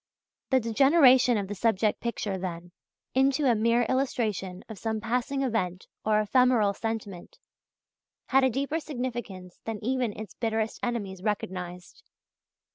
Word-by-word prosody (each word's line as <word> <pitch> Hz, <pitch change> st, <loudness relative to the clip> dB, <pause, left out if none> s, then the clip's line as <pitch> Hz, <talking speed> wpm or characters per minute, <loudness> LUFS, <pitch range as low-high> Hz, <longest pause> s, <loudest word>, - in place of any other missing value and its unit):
The 265 Hz, -, +4 dB
degeneration 255 Hz, +1 st, +5 dB
of 200 Hz, -2 st, -2 dB
the 205 Hz, -, -4 dB
subject 215 Hz, 0 st, +1 dB
picture, 220 Hz, -4 st, -2 dB
then, 175 Hz, -1 st, -6 dB, 0.4 s
into 270 Hz, +2 st, +2 dB
a 250 Hz, -, +5 dB
mere 230 Hz, +2 st, +2 dB
illustration 220 Hz, -7 st, -1 dB
of 215 Hz, -4 st, -9 dB
some 220 Hz, -1 st, -2 dB
passing 250 Hz, +5 st, -1 dB
event 185 Hz, -8 st, -1 dB, 0.2 s
or 215 Hz, 0 st, +3 dB
ephemeral 225 Hz, -1 st, +3 dB
sentiment, 210 Hz, -4 st, -5 dB, 0.9 s
had 270 Hz, 0 st, +4 dB
a 260 Hz, -, +4 dB
deeper 280 Hz, +6 st, -1 dB
significance 240 Hz, -, -6 dB
than 225 Hz, -1 st, -4 dB
even 250 Hz, -3 st, -1 dB
its 220 Hz, -, -8 dB
bitterest 220 Hz, -1 st, -2 dB
enemies 205 Hz, -6 st, -3 dB
recognized. 180 Hz, -4 st, -4 dB
225 Hz, 130 wpm, -27 LUFS, 200-255 Hz, 0.9 s, degeneration